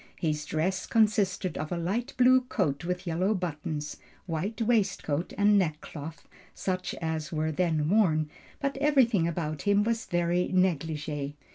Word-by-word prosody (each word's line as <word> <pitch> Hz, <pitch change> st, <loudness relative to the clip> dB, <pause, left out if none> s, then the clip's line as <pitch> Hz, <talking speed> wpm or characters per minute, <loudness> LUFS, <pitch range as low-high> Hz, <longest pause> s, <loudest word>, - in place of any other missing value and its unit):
His 150 Hz, -2 st, -1 dB
dress 175 Hz, +5 st, -1 dB
consisted 205 Hz, -6 st, +1 dB
of 155 Hz, +3 st, -4 dB
a 175 Hz, -, -1 dB
light 215 Hz, +10 st, -2 dB
blue 255 Hz, 0 st, +6 dB
coat 180 Hz, -, -1 dB
with 180 Hz, +1 st, -3 dB
yellow 185 Hz, +5 st, +1 dB
buttons, 150 Hz, -4 st, -4 dB, 0.3 s
white 190 Hz, +5 st, -3 dB
waistcoat 200 Hz, -9 st, 0 dB
and 205 Hz, 0 st, +5 dB
neckcloth, 155 Hz, -2 st, -4 dB, 0.3 s
such 185 Hz, -1 st, -2 dB
as 160 Hz, -2 st, -3 dB
were 155 Hz, -1 st, -1 dB
then 155 Hz, -2 st, +1 dB
worn, 165 Hz, -6 st, +3 dB, 0.3 s
but 275 Hz, -1 st, -2 dB
everything 260 Hz, -, +3 dB
about 155 Hz, -3 st, -3 dB
him 205 Hz, 0 st, +3 dB
was 230 Hz, +1 st, -1 dB
very 175 Hz, +1 st, +1 dB
negligee. 155 Hz, -5 st, -1 dB
175 Hz, 140 wpm, -28 LUFS, 155-205 Hz, 0.3 s, blue